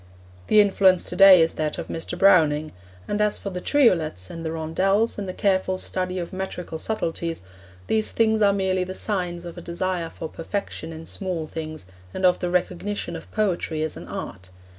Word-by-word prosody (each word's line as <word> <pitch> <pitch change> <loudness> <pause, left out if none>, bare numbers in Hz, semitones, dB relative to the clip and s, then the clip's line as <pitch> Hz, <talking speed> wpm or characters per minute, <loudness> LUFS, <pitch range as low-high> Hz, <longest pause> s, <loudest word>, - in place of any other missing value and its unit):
The 215 - +5
influence 190 -2 +4
to - - -5
day 195 -3 +9
is 160 - -1
that 155 -1 -2
of - - -5
Mr. 165 +2 -5
Browning. 155 -5 +4 0.4
And 205 0 -1
as 210 0 +1
for 200 - -6
the 180 -1 -5
triolets, 165 - +2
and 165 - -7
the 160 - -2
rondels, 190 +8 0
and 195 -2 -4
the - - -1
careful 190 -1 +1
study 185 0 -3
of 175 0 -5
metrical 185 -3 -5
subtleties, 165 - -3 0.4
these 215 - 0
things 220 -1 +2
are 200 -1 +5
merely 190 -2 0
the 185 +1 -6
signs 180 -5 -2
of 175 0 -8
a - - -9
desire 175 0 -2
for 160 - -7
perfection 165 -1 -5
in 160 0 -9
small 180 -4 -3
things 155 - -7 0.3
and 185 - 0
of 180 - +4
the 180 - -2
recognition 180 +3 -2
of - - -9
poetry 175 -7 -1
as 155 - -3
an - - -9
art. 90 0 -7
180 Hz, 190 wpm, -24 LUFS, 165-195 Hz, 0.4 s, day